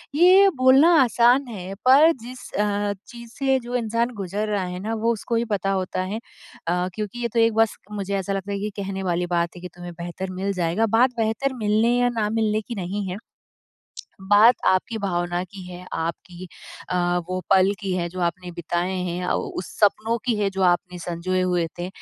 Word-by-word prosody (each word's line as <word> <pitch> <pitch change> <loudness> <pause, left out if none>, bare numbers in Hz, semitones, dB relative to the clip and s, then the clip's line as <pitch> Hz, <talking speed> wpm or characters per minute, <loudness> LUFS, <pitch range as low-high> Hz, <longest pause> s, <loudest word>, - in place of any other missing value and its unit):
ये 370 +5 +7
बोलना 260 +5 +6
आसान 245 +3 +3
है 195 -4 -7
पर 285 +6 +7
जिस 250 +2 -9
अ, 205 0 0
चीज़ 235 -1 -11
से 270 -1 +2
जो 245 0 -6
इंसान 230 0 0
गुज़र 200 +2 -3
रहा 205 -2 0
है 180 0 -5
ना 215 +4 -3
वो 230 +1 +3
उसको 230 +1 -3
ही 230 +1 +1
पता 195 0 0
होता 185 -1 -1
है। 200 +4 -4 0.5
अ, 180 +1 +1
क्योंकि 215 +2 -5
ये 240 - 0
तो 235 - +2
एक 225 0 +4
बस 225 -1 +2
मुझे 200 -1 -3
ऐसा 195 +1 -3
लगता 195 +1 -4
है 200 - -2
कि 210 +2 -2
कहने 195 0 -4
वाली 175 -1 0
बात 170 +1 -1
है - - -10
कि 180 - -6
तुम्हें 175 0 -8
बेहतर 175 +2 -6
मिल 195 +2 -2
जाएगा 180 +4 0
बात 250 +1 +5
बेहतर 225 +5 0
मिलने 220 +3 +3
या 245 0 +3
ना 210 -1 +1
मिलने 215 -1 0
की 235 +2 -7
नहीं 195 +1 -3
है। 180 - -4 1.1
बात 215 +4 +7
आपकी 190 +4 +1
भावना 175 -3 -1
की 190 +1 -11
है 180 0 -10
आपकी 175 +2 -5 0.4
अ, - - -1 0.3
वो 185 0 -2
पल 190 0 +5
की 195 -2 -3
है 175 -1 -1
जो 185 +2 -7
आपने 175 +1 -2
बिताए 175 +2 -2
हैं 180 -2 -3
या 180 - -1
उस 180 - -4
सपनों 215 +2 +2
की 240 - +2
है 205 -1 0
जो 190 0 -3
आपने 180 0 +1
सँजोए 175 +2 -2
हुए 180 -2 +1
थे 175 +1 -3
200 Hz, 205 wpm, -23 LUFS, 180-230 Hz, 1.1 s, ये